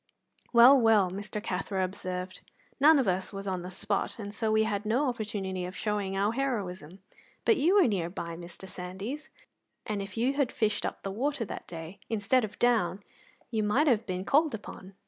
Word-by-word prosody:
"Well, 250 +3 +8
well," 215 -5 +4
Mr. 205 +2 -5
Cathro 190 -1 -2
observed, 185 0 -5 0.4
"none 305 +3 +7
of 265 -6 +1
us 185 0 0
was 195 -1 -6
on 185 -2 -2
the 180 - -6
spot, 200 +2 -2
and 205 -2 -6
so 215 +1 0
we 220 0 +4
had 210 -2 -1
no 240 +7 +1
opportunity 205 -6 -3
of 180 +2 -6
showing 200 -1 -1
our 200 +2 +2
heroism. 195 - -3 0.4
But 445 - +5
you 340 +8 +3
were 390 -8 +6
near 185 -6 -1
by, 170 -2 -5
Mr. 175 +2 -10
Sandys, 190 +12 -6 0.6
and 210 -2 -2
if 195 +2 -8
you 250 +4 +2
had 280 -3 +1
fished 215 -2 0
up - - -7
the 195 - -3
water 250 +3 -1
that - - -7
day, 165 +3 -8
instead 225 +3 +2
of 215 - -5
down, 205 -6 +2 0.5
you 220 -2 0
might 215 +9 +2
have 230 -6 +2
been 185 0 -3
called 295 +1 +3
upon. 195 -2 -10
205 Hz, 190 wpm, -29 LUFS, 185-235 Hz, 0.6 s, Well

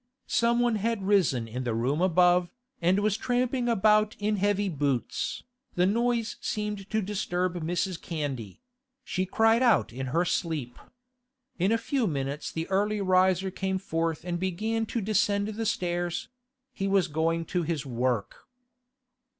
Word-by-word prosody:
Someone 235 -1 +2
had 215 -1 -1
risen 165 - +2
in 125 +3 -4
the 120 -3 -1
room 130 +8 0
above, 180 -1 +4 0.3
and 180 +3 +3
was 210 -1 +2
tramping 245 +1 0
about 215 -1 +3
in 210 0 0
heavy 205 +1 +1
boots. 140 -7 -2 0.3
The 180 - +3
noise 235 +2 0
seemed 210 -3 -3
to 220 -1 0
disturb 185 -3 -1
Mrs. 175 +2 -2
Candy; 140 - -5 0.4
she 185 -5 -2
cried 225 +4 +3
out 235 - +3
in 130 +1 -4
her 165 +8 +1
sleep. 150 -9 -2 0.8
In 185 +4 +2
a 230 - +4
few 260 -1 0
minutes 140 -1 -3
the 160 0 -4
early 205 +2 +1
riser 185 0 +3
came 190 0 -2
forth 165 -3 -2
and 175 -1 -2
began 215 +5 -1
to 230 - -2
descend 205 0 +1
the 220 +1 -3
stairs; 175 -2 -2 0.4
he 195 - -2
was 195 -2 +3
going 165 +1 0
to 180 - +2
his 160 -3 -2
work. 120 -4 -2
185 Hz, 150 wpm, -28 LUFS, 165-215 Hz, 0.8 s, above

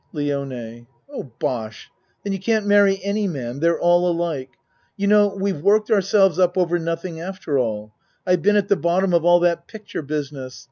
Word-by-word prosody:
LIONE 135 -6 -4 0.3
Oh, 140 - -7
bosh! 110 -4 -4 0.3
Then 200 - -2
you 195 - -3
can't 220 +2 0
marry 200 -1 +4
any 200 +1 -1
man 130 -6 -5
they're 170 +2 +1
all 175 +1 +3
alike. 165 -6 -2 0.5
You 200 - -1
know 205 0 +5
we've 190 -6 -2
worked 210 +4 +2
ourselves 195 -3 +3
up 180 0 +2
over 175 -1 +1
nothing 165 0 -4
after 175 -5 -3
all. 105 -3 -3 0.3
I've 180 -2 +2
been 210 +2 +3
at 205 -1 +2
the 200 - +3
bottom 180 +1 0
of 170 -1 +2
all 175 0 +6
that 170 -1 0
picture 215 -5 -7
business. 140 -3 -5
175 Hz, 180 wpm, -21 LUFS, 145-195 Hz, 0.5 s, all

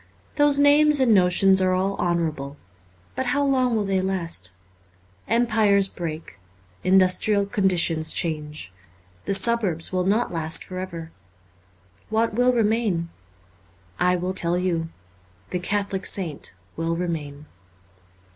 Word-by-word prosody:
Those 290 -1 +4
names 290 +1 +5
and 250 -4 +4
notions 190 0 +4
are 185 0 +2
all 195 +2 -1
honourable, 155 -5 -2 0.6
but 260 - -3
how 285 +3 +1
long 255 -3 +1
will 210 -2 -1
they 190 -1 0
last? 170 - -1 0.8
Empires 220 -4 +3
break; 160 - -7 0.4
indus 185 -1 +4
trial 205 -2 +2
conditions 180 -5 +1
change; 150 - -3 0.5
the 195 - +1
suburbs 195 -6 0
will 185 0 0
not 215 +1 0
last 160 -1 -1
for 185 -1 -7
ever. 170 -3 -7 1.0
What 225 +1 0
will 245 +3 +3
remain? 215 -7 0 0.9
I 180 0 +2
will 180 +1 -3
tell 175 -1 +1
you: 170 -3 -2 0.6
the 180 - -2
Catholic 200 0 -2
saint 160 - -2 0.2
will 165 +1 -2
remain. 155 -4 -5
185 Hz, 125 wpm, -23 LUFS, 165-215 Hz, 1.0 s, names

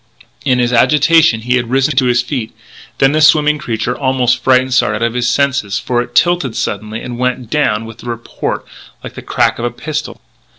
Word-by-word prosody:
In 130 -3 +2
his 120 0 0
agitation 150 0 +4
he 125 +2 +1
had 120 -2 -3
risen 135 +3 +1
to 130 - +3
his 120 0 +2
feet; 125 -4 -4
and 110 - -35 0.4
then 135 0 +3
the 155 +1 +1
swimming 150 -1 +4
creature 120 -2 -3
almost 130 -2 0
frightened 130 0 +3
Sard 105 -4 +2
out 105 - -3
of 115 0 0
his 125 0 0
senses, 130 -7 0
for 120 -1 -1
it 120 0 -9
tilted 175 -9 +2
suddenly 110 +2 -4
and 120 -1 -7
went 125 -2 -2
down 115 -7 0
with 115 +1 -11
a - - -11
report 115 -1 -4 0.4
like - - -8
the - - -9
crack - - 0
of 120 - -2
a - - 0
pistol. 150 +5 -5
125 Hz, 210 wpm, -15 LUFS, 115-140 Hz, 0.4 s, agitation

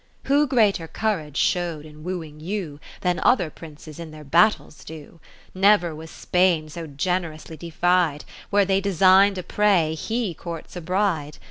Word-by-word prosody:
Who 290 +2 +2
greater 210 - +2
courage 160 -9 -3
show'd 170 -4 0
in 155 0 -13
wooing 165 -4 -6
you, 165 -4 -5 0.2
Than 180 -1 0
other 180 -11 +2
Princes 155 -1 -12
in 165 -1 -7
their 155 0 -11
battles 170 +2 +2
do. 160 +1 -11 0.3
Never 190 -3 +3
was 160 +1 -10
Spainsogenerously 165 -2 -1
defied; 170 -2 0 0.2
Where 205 -1 +3
they 195 0 +1
design'd 195 +1 +4
a 185 - -4
prey, 190 -7 +2
he 220 +4 -3
courts 165 +2 -8
a 175 - -5
bride. 170 -4 -1
175 Hz, 140 wpm, -23 LUFS, 155-195 Hz, 0.3 s, design'd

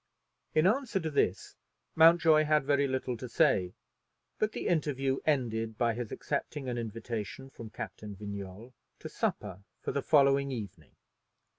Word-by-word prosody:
In 155 - +4
answer 230 0 +2
to 160 -3 -3
this, 95 -9 0 0.4
Mountjoy 160 -1 +6
had 150 -1 +3
very 140 0 +2
little 130 -1 -2
to 125 +2 -7
say: 115 - +2 0.6
but 215 0 +1
the - - -4
interview 135 -5 0
ended 115 -6 0
by 115 -1 +2
his 120 -1 -5
accepting 140 -3 -3
an 125 - -2
invitation 115 +3 -5
from 115 -4 -9
Captain 105 -1 -7
Vignolles 100 +3 -8 0.2
to - - -8
supper 95 +1 -3 0.2
for - - -3
the 140 - -1
following 140 -2 +4
evening. 100 - -8
130 Hz, 145 wpm, -30 LUFS, 110-150 Hz, 0.6 s, Mountjoy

